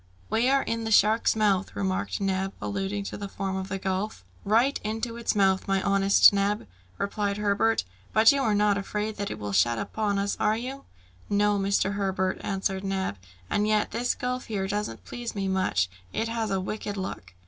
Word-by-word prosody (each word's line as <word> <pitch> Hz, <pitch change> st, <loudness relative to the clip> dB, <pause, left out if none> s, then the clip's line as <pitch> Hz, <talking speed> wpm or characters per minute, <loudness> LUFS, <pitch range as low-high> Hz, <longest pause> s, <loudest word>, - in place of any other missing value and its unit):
"We 235 Hz, +3 st, +3 dB
are 275 Hz, 0 st, +3 dB
in 230 Hz, 0 st, -2 dB
the 225 Hz, -, -2 dB
shark's 215 Hz, +1 st, +4 dB
mouth," 200 Hz, -3 st, +1 dB
remarked 95 Hz, -1 st, -1 dB
Neb, 195 Hz, 0 st, -1 dB
alluding 200 Hz, 0 st, -2 dB
to -, -, -6 dB
the 200 Hz, -1 st, -6 dB
form 195 Hz, -1 st, -3 dB
of 190 Hz, 0 st, -4 dB
the 195 Hz, -, -2 dB
gulf. 195 Hz, +2 st, -3 dB, 0.2 s
"Right 230 Hz, +7 st, +3 dB
into 225 Hz, +2 st, -3 dB
its 235 Hz, -1 st, -1 dB
mouth, 190 Hz, -1 st, +2 dB
my 195 Hz, 0 st, +2 dB
honest 195 Hz, 0 st, +6 dB
Neb!" 200 Hz, -, 0 dB, 0.3 s
replied 200 Hz, 0 st, -1 dB
Herbert; 210 Hz, +2 st, +2 dB, 0.3 s
"but 220 Hz, +1 st, +7 dB
you 280 Hz, -1 st, +1 dB
are 220 Hz, -5 st, +2 dB
not 205 Hz, -1 st, +3 dB
afraid 210 Hz, +2 st, -3 dB
that 200 Hz, -1 st, -3 dB
it -, -, -5 dB
will 105 Hz, -1 st, -5 dB
shut 115 Hz, +5 st, +3 dB
upon 205 Hz, -, -1 dB
us, 200 Hz, 0 st, 0 dB
are 215 Hz, +1 st, +2 dB
you?" 260 Hz, +4 st, -6 dB, 0.4 s
"No, 205 Hz, 0 st, +2 dB
Mr. 195 Hz, 0 st, +1 dB
Herbert," 190 Hz, -2 st, -1 dB
answered 190 Hz, 0 st, -2 dB
Neb; 190 Hz, -, -2 dB, 0.3 s
"and 205 Hz, -, +1 dB
yet 215 Hz, -1 st, +1 dB
this 240 Hz, +2 st, 0 dB
gulf 250 Hz, 0 st, -3 dB
here 195 Hz, -3 st, -2 dB
doesn't 190 Hz, -, -3 dB
please 240 Hz, -, -6 dB
me 195 Hz, -1 st, -1 dB
much! 185 Hz, -, +1 dB, 0.2 s
It 225 Hz, -, -1 dB
has 225 Hz, -1 st, -2 dB
a 195 Hz, -1 st, 0 dB
wicked 205 Hz, +1 st, -4 dB
look!" 95 Hz, -, -6 dB
200 Hz, 190 wpm, -27 LUFS, 190-215 Hz, 0.4 s, but